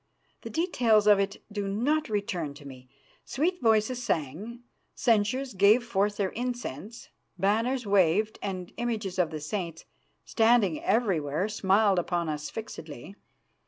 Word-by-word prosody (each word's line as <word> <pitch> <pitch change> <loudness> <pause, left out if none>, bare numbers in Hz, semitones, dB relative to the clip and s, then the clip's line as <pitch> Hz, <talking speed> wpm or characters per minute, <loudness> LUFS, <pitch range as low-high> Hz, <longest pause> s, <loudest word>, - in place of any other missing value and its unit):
The - - -7
details 235 - +2
of 205 -1 +6
it 200 0 -2
do 205 -1 -3
not 275 +10 0
return 180 -8 -2
to 145 0 -13
me. 130 -2 -12 0.3
Sweet 350 +8 -1
voices 225 +2 +2
sang, 205 - -3 0.3
censers 235 +3 +1
gave 200 +5 +5
forth 205 -2 0
their 195 -2 -1
incense, 240 - -5 0.3
banners 230 +6 +1
waved, 200 +2 +2
and 185 -3 -5
images 220 -6 -3
of 175 -3 +2
the 155 -1 -5
saints, 165 +1 -5 0.4
standing 225 -7 +2
everywhere, 185 -6 +1
smiled 200 -1 +2
upon 170 -1 -1
us 150 0 -4
fixedly. 170 - -8
205 Hz, 130 wpm, -28 LUFS, 175-230 Hz, 0.4 s, of